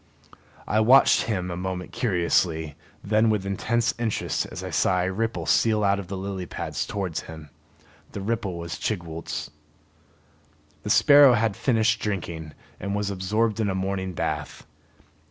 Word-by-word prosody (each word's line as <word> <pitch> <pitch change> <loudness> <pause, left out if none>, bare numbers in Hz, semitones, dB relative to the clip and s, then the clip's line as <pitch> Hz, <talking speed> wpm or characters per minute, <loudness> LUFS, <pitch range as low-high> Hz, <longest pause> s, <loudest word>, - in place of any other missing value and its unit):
I 110 - +2
watched 125 +5 +5
him 90 -5 -2
a - - -3
moment 90 0 -4
curiously, 85 - 0 0.3
then 110 +2 +3
with 105 -3 0
intense 115 +4 0
interest 115 -3 -1
as - - -8
I - - -5
saw 90 0 +2
a 95 +1 -1
ripple 115 +4 -2
steal 110 -2 +2
out 100 0 +2
of 95 - -7
the 100 - -5
lily 95 -1 -5
pads - - -4
towards 95 -5 -3
him. 80 -3 -10 0.6
The 100 - -5
ripple 105 -4 -2
was 85 -1 -6
Chigwooltz. 85 -8 -4 1.3
The 105 - -6
sparrow 145 +2 +7
had 115 -3 +1
finished 115 -2 +1
drinking 85 -6 -4 0.3
and 100 +1 -3
was 105 -1 -1
absorbed 105 +4 0
in 105 -2 +1
a 95 - -1
morning 95 -1 -2
bath. - - -4
100 Hz, 155 wpm, -25 LUFS, 90-110 Hz, 1.3 s, sparrow